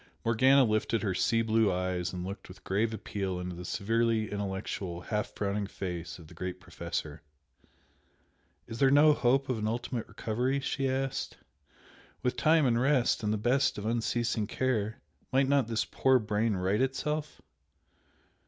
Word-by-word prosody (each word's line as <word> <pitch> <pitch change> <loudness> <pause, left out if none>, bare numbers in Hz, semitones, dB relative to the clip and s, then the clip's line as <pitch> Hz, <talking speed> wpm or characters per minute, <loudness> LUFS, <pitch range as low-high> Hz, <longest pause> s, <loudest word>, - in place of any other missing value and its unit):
Morgana 130 +4 +5
lifted 110 -1 0
her 100 -3 0
sea 115 +4 +2
blue 110 -2 +3
eyes 90 0 -1
and 90 -1 -5
looked 100 +2 -7
with 90 - -13
grave 105 +4 0
appeal 100 -3 -3
into 90 0 -5
the 90 - -7
severely 115 +3 0
intellectual, 95 -3 -4
half 105 +3 -2
frowning 100 0 -1
face 90 -4 -5
of 85 - -13
the - - -14
great 90 0 -5
Professor. 80 -4 -5 1.4
"Is 115 - -8
there 135 - +5
no 150 +2 +6
hope 135 0 +2
of 125 -4 -1
an 105 - -1
ultimate 120 +1 -3
recovery?" 125 +5 -1
she 135 0 -1
asked 135 0 -2 0.9
"With 125 0 0
time 155 +4 +4
and 120 -2 +2
rest 130 -3 +2
and 105 -1 0
the 110 - +1
best 125 +6 +2
of 105 - -5
unceasing 115 -1 0
care, 115 -3 -1 0.3
might 135 +1 +3
not 140 -4 +3
this 115 -1 0
poor 130 -1 +3
brain 105 -1 0
right 95 +4 0
itself?" 150 +3 -2
110 Hz, 160 wpm, -30 LUFS, 100-130 Hz, 1.4 s, no